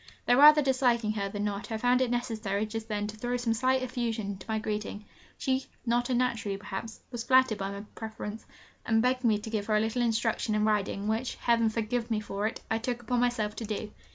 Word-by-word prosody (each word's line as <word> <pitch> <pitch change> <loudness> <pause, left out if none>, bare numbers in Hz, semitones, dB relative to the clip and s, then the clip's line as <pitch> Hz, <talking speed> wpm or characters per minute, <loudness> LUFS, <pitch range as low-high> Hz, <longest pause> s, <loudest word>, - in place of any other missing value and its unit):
Though 245 - +4
rather 300 +1 +9
disliking 245 -5 +2
her 200 -2 -2
than 205 +1 -3
not, 205 +1 -3
I 220 - -1
found 245 +3 +3
it 255 - +2
necessary 220 -4 -1
just 220 +1 -5
then 210 -2 -2
to 210 +1 -6
throw 245 +3 -2
some 240 -2 0
slight 255 +3 +2
effusion 230 -5 -2
into 195 0 -9
my 220 - +1
greeting. 210 -1 -4 0.3
She, 265 0 0 0.2
not 240 +1 +1
unnaturally 235 -5 0
perhaps, 210 +2 -6
was 240 -2 -4
flattered 260 -3 +4
by 195 0 -2
my 200 0 -6
preference, 220 -1 -6 0.4
and 225 0 +2
begged 255 +1 +1
me 220 -3 +4
to 210 +2 -7
give 210 -2 -2
her 215 - +2
a - - +4
little 225 +3 0
instruction 225 -1 +1
in 210 0 +2
riding, 205 -1 0
which 225 +4 -1
Heaven 230 -1 +2
forgive 230 +2 -2
me 220 -2 +1
for 205 0 -2
it! 225 - -6
I 225 - +2
took 240 +1 -3
upon 245 +1 0
myself 225 -4 0
to - - -4
do. 215 0 -4
225 Hz, 220 wpm, -29 LUFS, 210-245 Hz, 0.4 s, rather